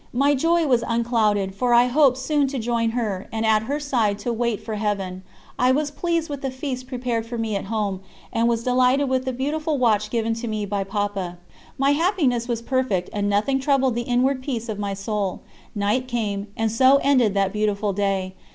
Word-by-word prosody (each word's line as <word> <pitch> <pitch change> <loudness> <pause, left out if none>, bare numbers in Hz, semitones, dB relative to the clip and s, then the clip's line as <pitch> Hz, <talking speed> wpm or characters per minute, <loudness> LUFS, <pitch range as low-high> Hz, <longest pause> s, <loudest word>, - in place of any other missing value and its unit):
My 280 +4 +3
joy 330 +4 +2
was 245 -5 +2
unclouded, 220 -4 +1
for 240 +4 +2
I 240 +1 +6
hoped 260 0 +4
soon 285 +1 +1
to 270 0 -4
join 230 -1 0
her, 205 -5 -2
and 225 0 -2
at 215 -1 +4
her 280 +7 -2
side 235 -8 0
to 240 - 0
wait 235 -2 -1
for 220 - -6
Heaven. 200 -3 -2 0.4
I 250 +1 +4
was 290 +2 0
pleased 335 +1 -1
with 285 -2 -6
the 270 - -2
feast 260 -1 -5
prepared 245 -3 -2
for 235 0 -5
me 225 -2 -2
at 195 - -3
home, 205 -2 -2 0.3
and 230 +1 +2
was 230 -1 0
delighted 255 +2 +3
with 260 0 0
the 260 - -1
beautiful 295 +4 -1
watch 215 -4 +2
given 225 -1 0
to 240 - -4
me 215 -2 -2
by 200 -1 -2
Papa. 195 -3 -3 0.4
My 275 +1 +3
happiness 285 - +1
was 235 -2 -2
perfect, 245 -9 -1
and 205 -1 0
nothing 215 +7 +1
troubled 270 -2 +2
the 240 - -1
inward 255 +2 +2
peace 240 -4 -4
of 210 -2 -4
my 200 -1 -2
soul. 200 -1 -3 0.3
Night 210 +5 0
came, 210 -4 -2
and 225 -1 0
so 260 +4 +5
ended 250 -8 +3
that 195 -1 +1
beautiful 210 -1 0
day. 195 -1 -1
235 Hz, 205 wpm, -23 LUFS, 210-260 Hz, 0.4 s, I